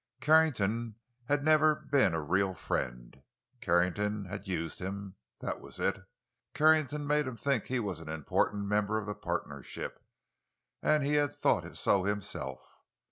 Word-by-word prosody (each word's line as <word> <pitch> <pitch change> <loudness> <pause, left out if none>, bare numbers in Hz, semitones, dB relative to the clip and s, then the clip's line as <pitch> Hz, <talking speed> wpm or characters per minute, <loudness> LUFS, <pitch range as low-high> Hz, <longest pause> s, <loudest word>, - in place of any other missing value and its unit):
Carrington 120 -7 +3 0.3
had 145 +2 +1
never 155 0 +5
been 135 - +2
a 80 - -1
real 95 +5 +1
friend. - - -4 0.4
Carrington 100 +4 +1
had 100 +2 -7
used 85 -3 -2
him—that 100 +1 -6
was - - -10
it; 100 - 0 0.5
Carrington 155 -1 +4
had 145 - -5
made 150 -1 +2
him 125 -2 -5
think 135 -5 0
he 130 -1 -1
was 100 -7 -3
an 80 -1 -9
important 80 +6 0
member 105 +1 +1
of 110 - -3
the 105 - -3
partnership, 70 -7 -5 0.8
and 150 -1 +3
he 145 +1 +1
had 145 -1 +3
thought - - 0
so 95 -2 +3
himself. 90 -10 -3
105 Hz, 145 wpm, -31 LUFS, 90-140 Hz, 0.8 s, never